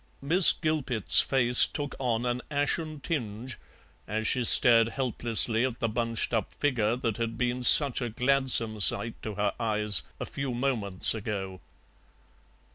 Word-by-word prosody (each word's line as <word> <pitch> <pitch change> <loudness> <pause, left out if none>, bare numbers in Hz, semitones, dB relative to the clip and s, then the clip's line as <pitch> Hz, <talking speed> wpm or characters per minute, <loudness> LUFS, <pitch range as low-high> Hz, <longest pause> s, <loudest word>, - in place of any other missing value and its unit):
Miss 170 +6 +4
Gilpet's 125 - 0
face 125 -2 +2
took 145 -2 -7
on 120 -2 -3
an 120 0 -4
ashen 150 +1 -3
tinge 120 -5 -7 0.5
as 110 +1 -5
she 125 - 0
stared 115 -1 +4
helplessly 115 -2 -2
at 130 -2 -5
the 115 - -3
bunched 115 +1 -4
up 110 -4 -3
figure 120 -6 -2
that 115 -3 -5
had 115 -1 -6
been 125 +1 -4
such 135 +1 +7
a 120 - -5
gladsome 125 -2 +2
sight 115 +3 +3
to 110 -2 -8
her 105 0 -3
eyes 105 -6 +2 0.2
a - - -6
few 135 -3 -7
moments 115 -8 -1
ago. 100 -4 -8
120 Hz, 145 wpm, -25 LUFS, 110-130 Hz, 0.5 s, such